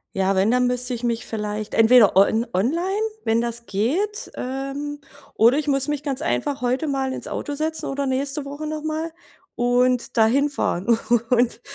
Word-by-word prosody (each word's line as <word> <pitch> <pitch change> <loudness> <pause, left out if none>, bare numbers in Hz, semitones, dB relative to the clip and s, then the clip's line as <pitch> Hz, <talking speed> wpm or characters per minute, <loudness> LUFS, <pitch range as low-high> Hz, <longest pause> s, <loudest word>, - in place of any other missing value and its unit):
Ja, 195 0 +1
wenn, 195 +4 +3
dann 250 0 +3
müsste 250 0 +1
ich 235 - -5
mich 235 -1 -1
vielleicht 210 -1 -4
entweder 225 -2 +6
on 220 +4 +4
online, 340 - 0 0.2
wenn 225 +1 +2
das 235 0 -4
geht. 375 - -1
Ähm, 275 +3 -5 0.3
oder 235 +5 +4
ich 305 0 -2
muss 275 -1 +2
mich 295 -1 -2
ganz 280 -2 -2
einfach 290 -4 -1
heute 255 +5 0
mal 270 -2 -1
ins - - -7
Auto 290 - -4
setzen 315 +2 -2
oder 280 +1 -2
nächste 275 +2 -1
Woche 290 +2 -6
noch 305 0 -4
mal 315 +1 -3 0.4
und 245 0 +1
da 220 -1 +5
hinfahren 240 -5 +1 0.3
und 240 -1 +2
255 Hz, 175 wpm, -22 LUFS, 230-290 Hz, 0.4 s, entweder